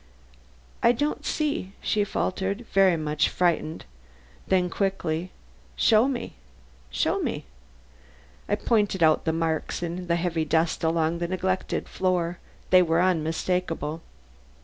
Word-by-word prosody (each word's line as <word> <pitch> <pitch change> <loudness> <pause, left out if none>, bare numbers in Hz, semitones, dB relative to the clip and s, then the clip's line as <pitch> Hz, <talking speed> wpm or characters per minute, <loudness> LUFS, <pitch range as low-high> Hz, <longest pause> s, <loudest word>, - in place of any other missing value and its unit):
"I 235 - +5
don't 290 +5 -2
see," 290 -11 -1
she 210 - +1
faltered, 195 +3 -2
very 190 -3 +5
much 155 -1 0
frightened; 170 -3 0 0.6
then 185 -1 +2
quickly: 180 -2 -2 0.5
"Show 225 +2 +4
me, 255 -3 -3 0.6
show 65 - 0
me." - - -3 1.0
I - - +3
pointed 205 -4 +1
out 155 -1 +4
the 160 - +2
marks 160 +1 -2
in 175 +1 -4
the 170 - +2
heavy 170 -2 0
dust 160 +2 +1
of 160 - +3
the - - -3
long 165 0 0
neglected 185 +2 -2
floor; 180 -2 -1 0.3
they 185 0 +8
were 165 -1 +2
unmistakable. 165 -2 0
180 Hz, 125 wpm, -26 LUFS, 165-190 Hz, 1.0 s, they